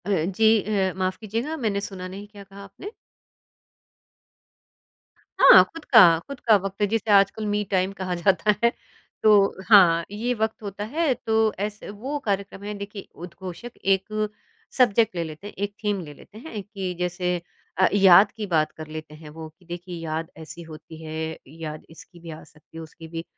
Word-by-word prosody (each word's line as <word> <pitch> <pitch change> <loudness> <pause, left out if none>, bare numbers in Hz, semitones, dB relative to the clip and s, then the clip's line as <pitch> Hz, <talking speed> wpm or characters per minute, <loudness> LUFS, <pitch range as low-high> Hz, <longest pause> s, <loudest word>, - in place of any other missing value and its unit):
अ, - - -5 0.3
जी 225 - +2 0.2
अ, 195 -3 0
माफ़ 185 0 -1
कीजिएगा, 230 +9 -4
मैंने 210 -7 -1
सुना 185 -2 -7
नहीं 195 +3 -9
क्या 205 -1 -13
कहा 195 +1 -13
आपने? 200 - -10 2.5
हाँ, - - +9
खुद 330 -2 -10
का 180 -9 +7
खुद 280 -2 -8
का 225 -2 +4
वक़्त 195 +1 -3
जिसे 220 0 -1
आजकल 200 +2 +3
मी 210 0 0
टाइम 190 0 +1
कहा 185 -2 -4
जाता 195 +4 +2
है। 235 - +5 0.5
तो 200 -3 +4
हाँ, 175 -6 +7
ये 230 +4 -2
वक़्त 220 -1 -2
होता 200 0 -5
है 300 +6 0
तो 220 -2 0
ऐसे 210 +1 -5
वो 250 +9 -5
कार्यक्रम 200 -1 -3
है 210 +1 -5
देखिए 200 0 -8
उद्घोषक 180 +6 -9
एक 210 +2 0 0.5
सब्जेक्ट 230 -5 +3
ले 170 - -1
लेते 160 +5 -9
हैं, - - -10
एक 205 +1 -4
थीम 205 -2 0
ले 150 -3 -10
लेते 205 +8 -16
हैं, 225 -4 -7
कि 195 -3 -5
जैसे 180 0 -2 0.4
अ, 185 0 +5
याद 195 0 +7
की 215 - -6
बात 155 -4 +1
कर 155 0 -8
लेते 155 0 -8
हैं 155 0 -12
वो, 160 +1 -9
कि 175 +4 -27
देखिए 175 +1 -7
याद 160 0 -4
ऐसी 160 +2 -10
होती 160 0 -12
है, 160 0 -5
याद 155 +1 -8
इसकी 165 +2 -15
भी 165 0 -11
आ 155 - -10
सकती 155 +1 -18
है, - - -6
उसकी 160 +1 -12
भी। 165 0 -6
195 Hz, 180 wpm, -24 LUFS, 170-210 Hz, 2.5 s, हाँ